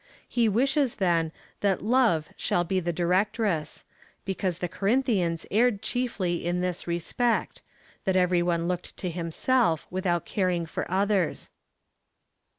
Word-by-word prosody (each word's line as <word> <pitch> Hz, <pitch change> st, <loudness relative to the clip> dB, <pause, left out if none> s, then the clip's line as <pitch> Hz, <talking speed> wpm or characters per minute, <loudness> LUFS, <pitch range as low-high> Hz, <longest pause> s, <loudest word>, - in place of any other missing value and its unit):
He 235 Hz, -2 st, +2 dB
wishes, 270 Hz, +4 st, +2 dB
then, 170 Hz, -4 st, +1 dB, 0.3 s
that 195 Hz, -2 st, +1 dB
love 220 Hz, -9 st, +3 dB
shall 175 Hz, -, 0 dB
be 185 Hz, +2 st, 0 dB
the 175 Hz, -1 st, -1 dB
directress; 180 Hz, -1 st, 0 dB, 0.4 s
because 190 Hz, -2 st, -1 dB
the 180 Hz, -, -2 dB
Corinthians 195 Hz, -4 st, 0 dB
erred 220 Hz, -1 st, +2 dB
chiefly 215 Hz, -9 st, -1 dB
in 175 Hz, +1 st, 0 dB
this 180 Hz, -1 st, -3 dB
respect 200 Hz, +8 st, -1 dB, 0.2 s
— -, -, -30 dB
that 190 Hz, -2 st, +1 dB
every 180 Hz, -1 st, +3 dB
one 170 Hz, -1 st, 0 dB
looked 180 Hz, 0 st, -4 dB
to 180 Hz, -, -3 dB
himself 170 Hz, +2 st, +1 dB
w^ithout 180 Hz, -2 st, 0 dB
caring 180 Hz, -4 st, 0 dB
for 165 Hz, -, -4 dB
others. 195 Hz, -2 st, 0 dB
185 Hz, 135 wpm, -27 LUFS, 175-215 Hz, 0.4 s, love